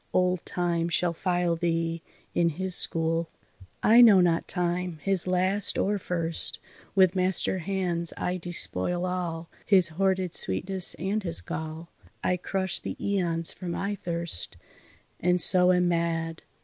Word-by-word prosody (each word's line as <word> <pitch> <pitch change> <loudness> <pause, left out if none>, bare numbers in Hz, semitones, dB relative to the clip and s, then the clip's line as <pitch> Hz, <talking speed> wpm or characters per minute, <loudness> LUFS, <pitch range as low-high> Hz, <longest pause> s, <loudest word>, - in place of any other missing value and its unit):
Old 180 -1 +1
Time 170 -1 -1
shall 170 0 0
file 175 -1 0
thee 165 -1 -2 0.3
in 170 -1 +2
his 185 +4 -4
school." 165 -1 +1 0.5
"I 230 +3 +7
know 215 -5 +8
not 170 -2 +1
Time, 180 -1 -2
his 195 -2 0
last 185 +2 +1
or 205 +1 0
first; 170 -3 -2 0.4
With 190 -1 +4
master 185 0 +1
hands 175 -2 -1
I 180 +1 -2
despoil 175 - -2
all 170 -2 -4
His 190 -4 +4
hoarded 185 +1 -1
sweetness 185 - +1
and 195 +5 -2
his 170 -4 +1
gall. 160 +1 -7 0.3
I 180 - +1
crush 190 +1 -3
the - - -6
aeons 170 -5 0
for 180 - -9
my 200 +4 -3
thirst, 170 - -4 0.6
And 180 +1 +2
so 180 0 +7
am 180 -1 +2
mad. 165 -1 -2
180 Hz, 140 wpm, -26 LUFS, 170-185 Hz, 0.6 s, know